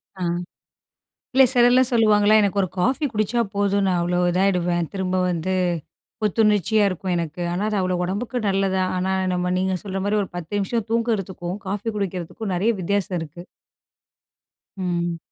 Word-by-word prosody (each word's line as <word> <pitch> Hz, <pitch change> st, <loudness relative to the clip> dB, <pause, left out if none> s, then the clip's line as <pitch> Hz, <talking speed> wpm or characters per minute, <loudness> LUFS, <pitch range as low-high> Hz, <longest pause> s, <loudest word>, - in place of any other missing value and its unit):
அ 190 Hz, -, -10 dB, 1.1 s
இல்ல 265 Hz, 0 st, +7 dB
சிலர்லாம் 245 Hz, 0 st, +5 dB
சொல்லுவாங்களா 215 Hz, -2 st, +4 dB
"எனக்கு 200 Hz, 0 st, 0 dB
ஒரு 185 Hz, -, -1 dB
காஃபி 260 Hz, -, +1 dB
குடிச்சா 215 Hz, +3 st, 0 dB
போதும். 200 Hz, 0 st, +1 dB
நான் 180 Hz, -1 st, +1 dB
அவ்வளோ 175 Hz, +1 st, 0 dB
இதாகிடுவேன் 175 Hz, -2 st, +1 dB
திரும்ப 185 Hz, -2 st, -2 dB
வந்து 175 Hz, +2 st, -1 dB, 0.7 s
புத்துணர்ச்சியா 210 Hz, 0 st, +2 dB
இருக்கும் 185 Hz, 0 st, -3 dB
எனக்கு." 170 Hz, 0 st, -3 dB
ஆனா 180 Hz, +3 st, -2 dB
அது 210 Hz, -1 st, -1 dB
அவ்வளோ 185 Hz, -1 st, 0 dB
உடம்புக்கு 210 Hz, +7 st, -3 dB
நல்லது, 195 Hz, -1 st, +1 dB, 0.2 s
ஆனா 185 Hz, +1 st, 0 dB, 0.2 s
நம்ம 180 Hz, 0 st, -1 dB
நீங்க 190 Hz, 0 st, 0 dB
சொல்ற 195 Hz, -1 st, -3 dB
மாதிரி 210 Hz, +1 st, +1 dB
ஒரு 195 Hz, -, -5 dB
10 175 Hz, +1 st, -7 dB
நிமிஷம் 205 Hz, +2 st, -1 dB
தூங்குறதுக்கும், 195 Hz, -6 st, -1 dB
காஃபி 205 Hz, +3 st, -3 dB
குடிக்கிறதுக்கும், 190 Hz, +1 st, -4 dB
நிறைய 205 Hz, +6 st, +2 dB
வித்தியாசம் 190 Hz, 0 st, -1 dB
இருக்கு. 160 Hz, +2 st, -8 dB, 1.4 s
ம். 175 Hz, -2 st, -2 dB
195 Hz, 145 wpm, -22 LUFS, 180-210 Hz, 1.4 s, இல்ல